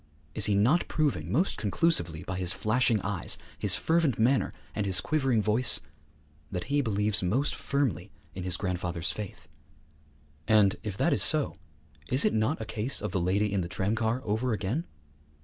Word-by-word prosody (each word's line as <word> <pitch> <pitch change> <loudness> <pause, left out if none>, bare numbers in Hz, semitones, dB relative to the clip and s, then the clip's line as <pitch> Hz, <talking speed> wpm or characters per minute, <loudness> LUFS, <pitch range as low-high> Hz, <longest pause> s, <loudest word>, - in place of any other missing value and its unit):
Is 105 - +2
he 105 - +2
not 125 - +3
proving 135 - -1
most 170 - +1
conclusively 100 - 0
by 95 - -5
his 90 0 +1
flashing 110 +2 +1
eyes, 100 -1 -1 0.2
his - - +2
fervent 160 -5 +1
manner, 125 +4 +2 0.2
and 105 -2 -2
his 95 -2 +3
quivering 130 -1 +1
voice 110 +3 +5 0.7
that 90 -2 -3
he 145 - +3
believes 105 -3 0
most 115 +11 0
firmly 140 - -2 0.2
in 95 - -6
his 90 -1 -1
grandfather's 90 -3 -2
faith? 105 -6 -8 1.0
And, 105 -3 +4
if 105 -4 -6
that - - +2
is - - +1
so, - - +4 0.5
is 130 +3 +2
it - - +2
not 110 +8 0
a 110 - -5
case 110 +4 -1
of - - -4
the 95 -2 -1
lady 100 +3 0
in 100 - +1
the 85 - -5
tramcar 110 +6 -1
over 110 +4 -1
again? 110 - -3
105 Hz, 170 wpm, -28 LUFS, 95-130 Hz, 1.0 s, voice